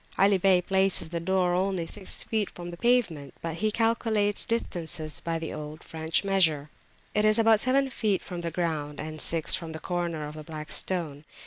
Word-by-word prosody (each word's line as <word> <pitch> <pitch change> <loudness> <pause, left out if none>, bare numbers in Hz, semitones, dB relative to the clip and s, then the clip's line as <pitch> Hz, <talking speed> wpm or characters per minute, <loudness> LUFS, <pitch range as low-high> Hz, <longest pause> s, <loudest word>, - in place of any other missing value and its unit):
Ali 195 0 +4
Bey 185 -1 +4
places 190 -3 +3
the 170 0 -3
door 180 +1 +1
only 185 -1 0
six 190 +3 -3
feet 215 -3 -1
from 175 0 -8
the - - -7
pavement, 185 - +1
but 165 -1 -3
he 215 +3 +1
calculates 220 -2 +1
distances 165 -9 -2
by 165 -1 -2
the 160 -1 -5
old 150 +1 -7
French 160 +2 -1
measure. 160 -7 +2 0.4
It 210 - +2
is 215 +1 +5
about 225 -1 +5
seven 265 +3 +3
feet 210 -5 0
from 175 -2 -6
the 170 - -2
ground, 155 -4 -3
and 155 0 -4
six 165 -2 +2
from 165 -3 -2
the 160 - -6
corner 170 -4 -3
of 150 - -8
the 155 0 -8
Black 155 -1 -7
Stone. 155 -4 -2
175 Hz, 195 wpm, -27 LUFS, 160-205 Hz, 0.4 s, is